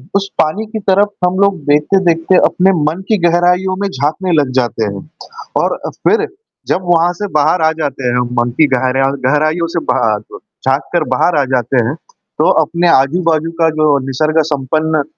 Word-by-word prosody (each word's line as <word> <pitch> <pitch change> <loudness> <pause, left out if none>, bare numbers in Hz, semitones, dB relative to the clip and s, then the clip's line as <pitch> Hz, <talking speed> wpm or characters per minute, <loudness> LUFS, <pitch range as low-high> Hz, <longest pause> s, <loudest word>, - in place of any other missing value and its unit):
उस 195 0 0
पानी 160 +8 0
की 220 0 -5
तरफ़ 200 +2 +3 0.2
हम 185 +2 -2
लोग 200 -2 +2
देखते-देखते 165 +3 +2
अपने 190 +1 +2
मन 160 +5 -2
की 215 - +2
गहराइयों 180 +2 +1
में 200 - 0
झाँकने 160 +3 -2
लग 135 -3 -3
जाते 120 -2 -2
हैं 125 +10 -10 0.5
और - - 0
अ, - - -2
फ़िर 440 0 0 0.4
जब 185 - 0
वहाँ 170 +1 +2
से 205 +4 -5
बाहर 155 +4 +2
आ 160 0 +3
जाते 140 -2 -3
हैं 120 - 0
हम। 125 - -1
मन 120 - -1
की 155 - +6
गहरेया 130 +2 +1 0.2
गहराइयों 155 +4 +1
से - - +2
बाहर 115 -3 +1
आ 105 - 0
जव 105 - -13 0.3
झाँककर - - 0
बाहर 175 - +1
आ - - +1
जाते 125 0 +1
हैं। 135 - -3 0.4
तो - - +3
अपने 175 0 -1
आजू-बाजू 165 +2 +2
का 165 - +4
जो 150 -2 +3
निसर्ग-संपन्न 155 +1 0
160 Hz, 180 wpm, -14 LUFS, 140-180 Hz, 0.5 s, की